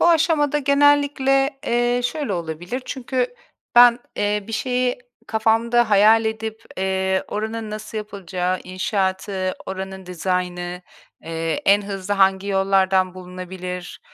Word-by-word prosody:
Bu - - +5
aşamada 315 -3 +3
genellikle, 280 -1 +3
eee, 240 +1 +2
şöyle, 245 -1 -2
olabilir. 175 +7 -4
Çünkü 250 -1 -2 0.4
ben, 240 0 +8 0.2
eee, 205 0 0
bir 225 - -8
şeyi 250 +2 0 0.3
kafamda 225 +1 +2
hayal 215 +2 +6
edip, 220 0 -4
eee, 190 0 0
oranın 220 +1 -4
nasıl 215 +1 -5
yapılacağı, 185 -3 -3
inşaatı, 190 0 -2
oranın 190 0 -6
dizaynı, 180 0 -3 0.4
eee, 165 -1 -3
en 200 +1 +5
hızlı 200 0 -3
hangi 195 0 +3
yollardan 190 -1 +2
bulunabilir. 180 0 -7
205 Hz, 115 wpm, -22 LUFS, 185-240 Hz, 0.4 s, ben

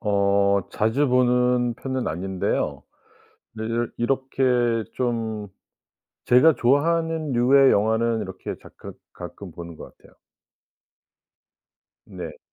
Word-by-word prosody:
어 100 -1 +2
자주 120 +7 +1
보는 125 -1 +2
편은 130 0 -4
아닌데요. 95 +3 -2 0.7
네. 110 0 -6
이렇 115 +1 -1
이렇게 130 +2 -1 0.5
좀 115 -4 -3 0.8
제가 130 +6 +6
좋아하는 160 +3 +1
류의 135 +3 +5
영화는 110 +2 +1
이렇게 95 -2 -6
자끄 - - -12 0.2
가끔 - - -9
보는 85 -1 -9
것 - - -12
같아요. - - -21 1.9
네. - - -9
120 Hz, 205 characters per minute, -23 LUFS, 105-130 Hz, 1.9 s, 제가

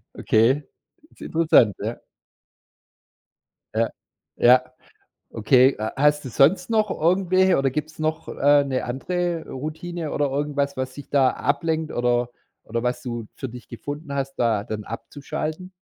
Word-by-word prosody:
Okay, 125 +7 +2 0.5
ist - - -22
interessant, 155 - +3
ja. - - -4 1.7
Ja, - - +1 0.5
ja. 125 +1 +6 0.7
Okay, 125 +4 +4
h 110 0 -3
hast 150 +1 +3
du - - -5
sonst 180 - +3
noch 215 -2 +2
irgendwelche 185 +2 +3
oder 135 -1 +2
gibt 150 +3 -3
es - - -21
noch, 155 +1 -2
äh, 145 0 +4
'ne 130 -2 -2
andere 170 +6 -2
Routine 160 +3 -5
oder 145 - +1
irgendwas, 140 0 -1
was 130 0 -4
dich 145 - -10
da 135 -3 +4
ablenkt 160 +3 -1
oder 120 0 +1 0.3
oder 115 +1 -3
was 125 0 -1
du 120 -3 -5
für 135 - -5
dich 125 +1 -11
gefunden 145 +4 -7
hast, 135 0 -3
da 110 -4 +1
dann 110 -2 -5
abzuschalten? 155 - -6
140 Hz, 145 wpm, -23 LUFS, 125-160 Hz, 1.7 s, ja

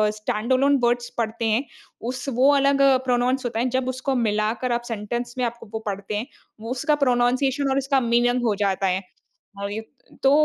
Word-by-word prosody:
Stand 215 +2 -3
alone 280 +2 +4
words 240 0 +1
पढ़ते 230 0 -2
हैं, 225 +4 +2 0.4
उस 250 +2 -4
वो 260 +4 +5
अलग 275 0 +3 0.2
प्रोनाउंस 255 +1 +1
होता 230 -2 -2
है 250 +2 +1
जब 260 -1 -1
उसको 260 +1 -2
मिलाकर 220 +1 0
आप 240 0 0
सेंटेंस 240 +3 -4
में 250 - +1
आप 235 0 -4
वो 220 - -2
पढ़ते 200 0 -4
हैं, 220 +4 -3 0.4
उसका 295 +5 +1
प्रोनन्सिएशन 255 +3 +2
और 265 - +1
उसका 275 0 +2
मीनिंग 240 +1 +2
हो 215 -3 +2
जाता 195 -1 0
है। 185 +1 0 0.6
हाँ, 200 0 -3
ये 210 +2 -3 0.4
तो 270 - +5
240 Hz, 185 wpm, -23 LUFS, 220-260 Hz, 0.6 s, वो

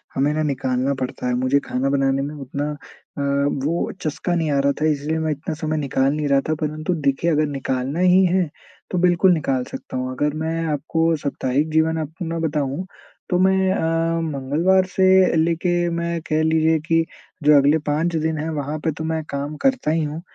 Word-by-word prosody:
हमें 140 +3 +2
ना 155 0 0
निकालना 135 -1 0
पड़ता 125 -1 -4
है। 125 - 0
मुझे 130 +3 +2
खाना 130 +2 -1
बनाने 135 -1 +1
में 145 +2 -4
उतना 140 +1 -4
अ, - - -5 0.9
वो 170 +3 -1
चस्का 165 +3 -2
नहीं 160 -3 0
आ 140 - +2
रहा 140 +1 +3
था - - +2
इसलिए 150 +2 -2
मैं 160 -1 -1
इतना 155 +2 -4
समय 155 0 -2
निकाल 135 -1 +1
नहीं 150 -1 -1
रहा 140 -1 +3
था 155 - +2
परंतु 155 +3 -2
देखिए 165 +5 +1
अगर 155 0 +2
निकालना 135 +2 -2
ही 185 +1 +5
है 180 -2 +1 0.4
तो 180 - -1
बिल्कुल 180 +1 +4
निकाल 135 -5 0
सकता - - -6
हूँ। 130 0 -2
अगर 145 +3 -1
मैं 165 +1 -1
आपको 160 +3 0
साप्ताहिक 140 +1 -1
जीवन 160 +1 +2
अपना 165 +2 -5
बताऊँ 150 +1 -2 0.4
तो 180 - +2
मैं 190 0 +3
अ, 165 +1 0
मंगलवार 160 +6 +1
से 190 -2 +5
लेके 175 +1 0
मैं 170 0 -2
कह 155 +1 +2
लीजिए 160 0 +3
कि 165 +1 +1 0.4
जो 150 0 +6
अगले 145 +3 +4
5 165 +3 0
दिन 160 0 0
हैं 155 +2 -3
वहाँ 150 0 -3
पे 160 0 -1
तो 160 - -4
मैं 160 0 -2
काम 140 +2 -4
करता 260 - +2
ही 160 0 +1
हूँ, 150 +2 -4
155 Hz, 195 wpm, -21 LUFS, 140-165 Hz, 0.9 s, जो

